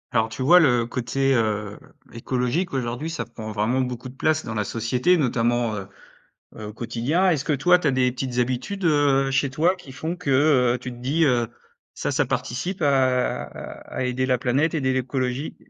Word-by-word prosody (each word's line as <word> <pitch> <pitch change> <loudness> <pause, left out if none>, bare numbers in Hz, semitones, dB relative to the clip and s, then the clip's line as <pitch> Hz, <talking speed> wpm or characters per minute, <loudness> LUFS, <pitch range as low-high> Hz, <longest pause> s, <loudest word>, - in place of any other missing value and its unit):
Alors, 110 -2 +2
tu 110 +2 -8
vois? 170 +8 +7
Le 125 -7 +3
côté, 130 +3 0
heu, 105 -2 -1 0.3
écologique 125 +9 -2
aujourd'hui 125 +4 -3
ça 165 - -3
prend 110 -2 -8
vraiment 110 +5 0
beaucoup 125 -1 -3
de - - -13
place 155 +3 +1
dans 110 - -4
la 105 -1 -1
société 125 - +1
notamment, 120 -5 +1
heu 95 -1 -6 0.7
heu, 110 - -7
au - - -8
quotidien. 120 - 0
Est-ce 155 -6 0
que 150 - +1
toi 180 +6 +4
tu 175 - -3
as - - +4
des 130 -1 +1
petites 125 -1 -4
habitudes, 130 +11 -2
heu, 145 -4 +3
chez 140 +1 +1
toi 160 +7 +2
qui 145 -7 -13
font 160 +6 -4
que, 180 -4 -8 0.5
heu, - - -2
tu 125 - -7
te 120 - -11
dis, 140 +7 +1
heu: 120 -5 +2 0.5
«Ça - - -2
ça - - +1
participe 175 +9 -3
à 130 -3 +2
à - - -7
aider 125 +1 -1
la 130 -1 +2
planète, 130 +7 0
aider 130 -4 +1
l'écologie»? 130 +1 -2
130 Hz, 195 wpm, -23 LUFS, 120-145 Hz, 0.7 s, vois